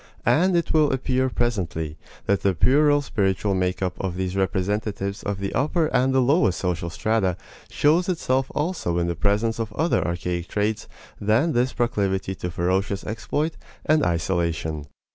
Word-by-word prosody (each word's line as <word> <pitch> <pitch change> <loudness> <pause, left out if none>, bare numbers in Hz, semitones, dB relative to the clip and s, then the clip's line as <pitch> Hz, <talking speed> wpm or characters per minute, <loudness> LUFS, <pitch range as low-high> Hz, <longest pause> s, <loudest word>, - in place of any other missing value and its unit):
And 170 - +4
it 170 - -1
will 155 -2 +4
appear 130 0 0
presently 90 -11 -2 0.3
that 100 - +1
the 95 -2 +1
puerile 145 - +4
spiritual 100 -4 0
make 90 0 -1
up 90 -2 -3
of 95 -2 -3
these 95 0 -2
representatives 100 +1 -1
of 100 -1 -3
the 100 0 -4
upper 155 +3 +1
and 130 +1 +3
the 130 -1 +3
lowest 135 - +3
social 85 -2 -2
strata 100 -1 0 0.3
shows 165 +5 +2
itself 135 -7 0
also 150 - -1
in 85 - +1
the 85 0 -1
presence 105 +5 0
of 115 -2 -3
other 165 +3 +1
archaic 85 0 -3
traits 105 +3 -1 0.3
than 110 +11 +2
this 125 -2 +1
proclivity 100 -5 0
to 90 -1 -5
ferocious 95 +3 -1
exploit 145 +9 -2 0.3
and 155 -1 +3
isolation. 85 -3 -1
105 Hz, 160 wpm, -24 LUFS, 90-130 Hz, 0.3 s, And